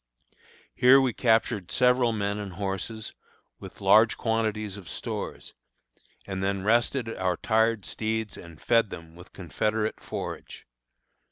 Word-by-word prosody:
Here 125 - +6
we 130 -3 +1
captured 110 -5 +1
several 125 -1 +3
men 100 -1 -2
and 100 -3 -6
horses, 100 +3 -4 0.5
with - - -11
large - - +5
quantities 110 -2 -1
of 95 -6 -10
stores, - - -5 0.7
and 95 -1 -4
then 100 -1 -1
rested 120 +3 +2
our 90 -1 0
tired 110 -2 +1
steeds 110 -1 -3
and 85 -2 -12
fed 115 -3 +2
them 85 -2 -10
with 90 +1 -14
confederate 105 +5 -2
forage. - - -7
110 Hz, 125 wpm, -27 LUFS, 95-115 Hz, 0.7 s, Here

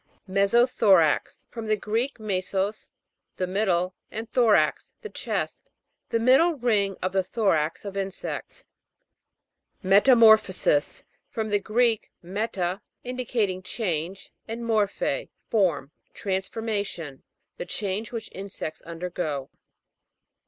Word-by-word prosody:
ME'SOTHORAX. 200 - +3
From 230 -2 -6
the 215 0 +2
Greek, 230 +6 -1
mesos, 200 0 -2 0.5
the 185 - 0
middle, 185 -2 +1 0.2
and 225 +1 -5
thorax, 215 -11 +3
the 435 - -7
chest. - - -4 0.4
The - - +1
middle 265 +9 +5
ring 210 -7 +1
of 185 - 0
the 190 0 +1
thorax 175 -6 0
of 200 -1 -6
insects. 195 -1 -5 1.2
METAMOR'PHOSIS. 210 - +5 0.3
From 220 -1 -3
the 205 - +3
Greek, 225 +1 +1
mela, 190 -1 -2 0.2
indicating 240 -7 -1
change, 185 -2 -3 0.2
and 230 +1 -5
mor 215 -3 +3
phe, - - -3 0.2
form. 170 -10 +1 0.2
Transformation. 195 -6 -3 0.4
The - - -5
change 205 +4 -2
which 230 -2 -5
insects 190 -5 -6
undergo. 165 -5 -4
200 Hz, 105 wpm, -26 LUFS, 185-225 Hz, 1.2 s, middle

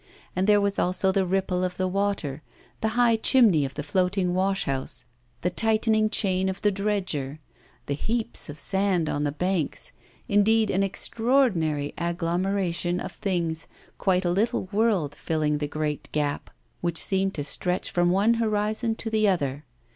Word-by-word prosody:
And 185 +2 +1
there 210 -1 +5
was 200 0 0
also 185 +1 +1
the 190 -1 +1
ripple 185 -1 0
of 180 0 -2
the 185 - 0
water, 185 -7 -2 0.4
the 220 - +1
high 235 -2 +4
chimney 220 - +4
of 135 - -7
the 150 - -4
floating 180 +3 0
washhouse, 185 -8 -1 0.4
the 180 - 0
tightened 220 +1 +2
chain 190 -3 +1
of 190 - -4
the 205 - +4
dredger, 190 -8 -2 0.5
the 140 - -2
heaps 220 +5 -1
of 145 +1 -8
sand 190 -1 +1
on 145 +1 -1
the 145 - 0
banks, 175 +1 -2 0.4
indeed, 215 +2 +3
an 190 - +1
extraordinary 195 - +1
agglomeration 175 +1 -1
of - - -5
things, 170 -4 -2 0.3
quite 185 -1 +1
a 175 - +2
little 210 +2 0
world 205 -9 +1
filling 150 -2 -1
the 145 - -2
great 150 0 -3
gap 145 -1 -2 0.3
which 170 -1 -1
seemed 195 +1 +1
to 145 - -2
stretch 180 +5 -1
from 175 0 +2
one 200 +6 +3
horizon 220 0 0
to 225 0 -5
the 215 -1 +3
other. 145 -6 -1
185 Hz, 160 wpm, -25 LUFS, 165-205 Hz, 0.5 s, there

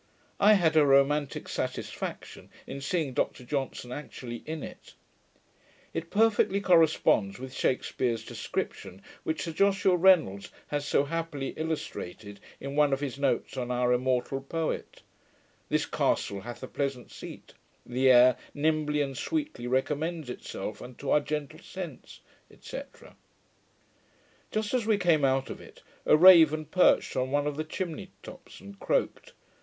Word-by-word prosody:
I 210 +1 +7
had 170 -6 +3
a 155 - +6
romantick 140 0 +2
satisfaction - - -5 0.2
in 140 - -7
seeing 150 -2 -1
Dr 125 -1 -1
Johnson 135 -2 -3
actually 125 -4 -7
in 160 -1 -4
it. - - -11 1.0
It 165 0 -4
perfectly 210 -2 +3
corresponds 160 - +3
with 130 +1 -8
Shakspeare's 125 -3 -1
description, 95 +2 -5 0.2
which 160 - -2
Sir 165 - -4
Joshua 195 +1 +3
Reynolds 165 - +3 0.2
has 145 0 -2
so - - +3
happily 155 -2 -3
illustrated, 110 - -5 0.2
in 140 +1 -6
one 145 -2 +4
of 135 - 0
his 140 -2 -4
notes 140 -4 0
on 125 -1 -3
our 125 0 +2
immortal 130 +1 0
poet: 160 +3 -4 0.7
This - - +1
castle 100 -1 -1
hath 120 +4 -8
a - - -4
pleasant 135 -3 -4
seat: - - -10 0.3
the 130 +2 +2
air 125 0 +7 0.2
Nimbly 150 0 +1
and 135 -1 -5
sweetly 300 - -3
recommends 150 +3 -1
itself 105 -3 -6
Unto 125 +3 -6
our - - +5
gentle 150 +1 -4
sense, 175 -8 -9 0.4
&c. - - -6 1.7
Just 215 +1 -2
as 240 -4 0
we 215 -2 +3
came 170 -6 +2
out 135 0 +1
of - - -8
it, - - -16 0.2
a 150 - +6
raven 160 -3 +7
perched 180 +5 +3
on 130 0 0
one 145 +1 +1
of 150 -1 -2
the 155 - -2
chimney 180 +3 -5
tops, - - -12
and 200 0 -12
croaked. - - -1
145 Hz, 145 wpm, -28 LUFS, 130-165 Hz, 1.7 s, I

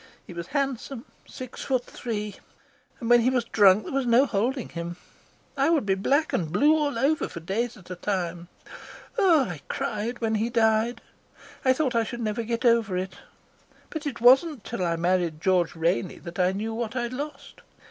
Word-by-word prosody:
He - - -10
was 170 0 -6
handsome, 275 -2 -3 0.2
six 255 -2 -8
foot 255 -2 0
three, 210 -3 -5 0.6
and 230 - -5
when 240 0 +6
he 245 - +3
was 250 -3 0
drunk 205 -2 +5
there - - -7
was 270 -2 0
no 240 +4 +5
holding 245 +3 -1
him. 170 +1 -6 0.6
I 275 +2 +2
would 315 -9 +2
be 195 - +2
black 275 +11 +1
and 160 -4 -1
blue 290 - +4
all 290 -5 0
over 290 +6 +1
for - - -7
days 215 +8 -2
at 185 -2 -14
a - - -3
time. 175 -2 -3 0.7
Oh, 350 -7 +5
I 175 - -4
cried 220 +4 -3
when 225 -1 0
he 230 - 0
died. 225 0 +2 0.6
I 260 - +5
thought 265 -2 0
I 230 -1 +2
should 240 +2 -6
never 215 +1 -1
get 230 +1 -3
over 230 -5 +3
it. 185 +1 -4 0.7
But 315 -2 -4
it 270 - -4
wasn't 260 +2 +5
till 185 - -4
I 170 -1 +1
married 175 -2 0
George 180 -1 +1
Rainey 170 +2 0
that 170 +2 -9
I 180 0 +3
knew 215 +3 -3
what 230 +1 -4
I'd 240 0 -2
lost. 290 +3 -7
230 Hz, 190 wpm, -26 LUFS, 185-260 Hz, 0.7 s, when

